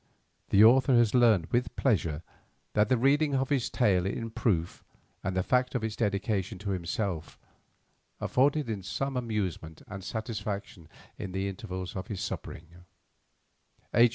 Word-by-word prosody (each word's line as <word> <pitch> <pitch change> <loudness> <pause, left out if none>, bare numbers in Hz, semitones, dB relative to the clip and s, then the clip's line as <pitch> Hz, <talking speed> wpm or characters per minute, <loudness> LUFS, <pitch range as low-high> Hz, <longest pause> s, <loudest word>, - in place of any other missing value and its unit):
The 100 - +6
author 130 +3 +6
has 120 -3 +4
learned 115 -9 +5
with 120 +1 0
pleasure 85 - 0 0.5
that 105 0 +3
the 130 - +4
reading 140 +3 +3
of 135 0 0
this 135 -5 +1
tale 95 -6 +2
in 115 +3 -3
proof 90 -7 -1 0.4
and 95 0 -2
the 95 - +2
fact 125 +3 +1
of 120 - -1
its 110 -1 -2
dedication 100 -2 -1
to 100 +2 -4
himself 90 -2 -3 0.8
afforded 140 +2 +2
him 105 -3 -3
some 135 +8 -3
amusement 100 -10 -3
and 100 -1 -7
satisfaction 100 -5 -5 0.3
in 95 -2 -5
the 95 +1 -1
intervals 95 -1 -6
of 95 +1 -5
his 105 -6 -5
sufferings. 85 +1 -6 1.2
H. 120 0 +6
105 Hz, 150 wpm, -29 LUFS, 95-120 Hz, 1.2 s, The